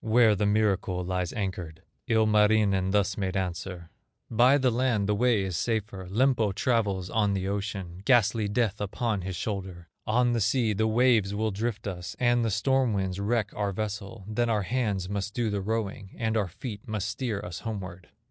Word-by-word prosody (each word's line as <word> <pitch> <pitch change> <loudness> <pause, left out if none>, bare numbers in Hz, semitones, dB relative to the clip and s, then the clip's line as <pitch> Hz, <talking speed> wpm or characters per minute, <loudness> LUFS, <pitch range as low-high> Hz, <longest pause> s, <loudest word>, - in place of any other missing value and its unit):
Where 115 -1 +5
the 100 +1 +1
miracle 100 -4 +1
lies 90 -1 -1
anchored." 90 -7 -4 0.2
Ilmarinen 105 -3 +3
thus 100 0 +1
made 95 0 -1
answer: 90 -2 -4 0.4
"By 125 +5 +5
the 130 -3 +2
land 120 -4 +1
the 105 - +2
way 115 -1 +2
is 95 -2 -3
safer, 100 -2 -2
Lempo 115 -1 +2
travels 100 -7 0
on 105 -3 +2
the 95 0 -2
ocean, 100 -3 -4
Ghastly 110 -3 +3
Death 105 -1 0
upon 105 0 -1
his 95 0 -4
shoulder; 95 -3 -5 0.2
On 120 +2 +3
the 115 - 0
sea 110 +1 +2
the 110 +2 +1
waves 110 -3 +3
will 110 +1 0
drift 110 +2 -3
us, 90 -3 -5
And 120 -1 +3
the 115 - +1
storm 130 +3 +2
winds 95 -1 -2
wreck 105 +1 0
our 100 -1 -1
vessel; 100 -1 -5
Then 115 +2 0
our 105 -3 +1
hands 105 -5 -1
must 100 +1 -3
do 115 -3 0
the 100 -1 -1
rowing, 105 -1 -3
And 110 -1 -1
our 105 -4 +1
feet 105 +5 -8
must 105 -3 -2
steer 115 -2 -2
us 90 -4 -6
homeward." 95 -5 -6
105 Hz, 180 wpm, -27 LUFS, 95-115 Hz, 0.4 s, Where